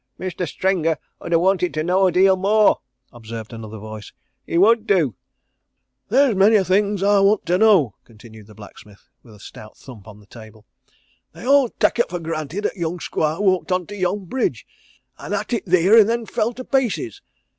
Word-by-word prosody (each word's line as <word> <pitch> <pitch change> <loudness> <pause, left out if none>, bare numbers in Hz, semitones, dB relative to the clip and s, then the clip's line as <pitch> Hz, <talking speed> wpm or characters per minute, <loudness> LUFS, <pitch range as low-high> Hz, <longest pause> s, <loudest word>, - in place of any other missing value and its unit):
"Mestur 180 -1 -4
Stringer 165 -3 -1 0.3
'ud - - -7
ha' 165 - +4
wanted 180 0 0
to 155 - -1
know 185 +3 +2
a - - +1
deal 190 +2 +4
more," 205 +3 +2 0.3
observed 115 -1 -9
another 110 -1 -9
voice. 110 0 -10 0.4
"He - - -2
would 220 +4 +3
do!" 165 - +2 1.0
"There's 260 +2 +3
a - - -5
many 200 +1 +4
things 200 +1 0
I 205 0 +3
want 200 +1 +2
to 180 +1 +1
know," 195 - +4
continued 110 -2 -16
the 105 - -16
blacksmith, 105 -1 -16
with 110 -3 -17
a - - -18
stout 110 +1 -13
thump 115 -6 -14
of 105 -1 -13
the 105 - -19
table. 110 0 -15 0.7
"They - - -11
all 275 -1 +4
tak' - - 0
it 240 - +1
for 175 - -4
granted 165 +4 -5
'at - - -2
young 175 -1 -4
squire 155 0 -2
walked 190 -2 0
on 180 -1 0
to 205 - -9
yon 190 +1 -2
bridge, 255 +9 -3 0.5
an' - - -6
'at - - -3
it 230 - -3
theer 185 +4 +4
and 215 0 +4
then 235 0 -1
fell 220 +1 -2
to 255 - -8
pieces. 240 - -2
180 Hz, 195 wpm, -20 LUFS, -, 1.0 s, ha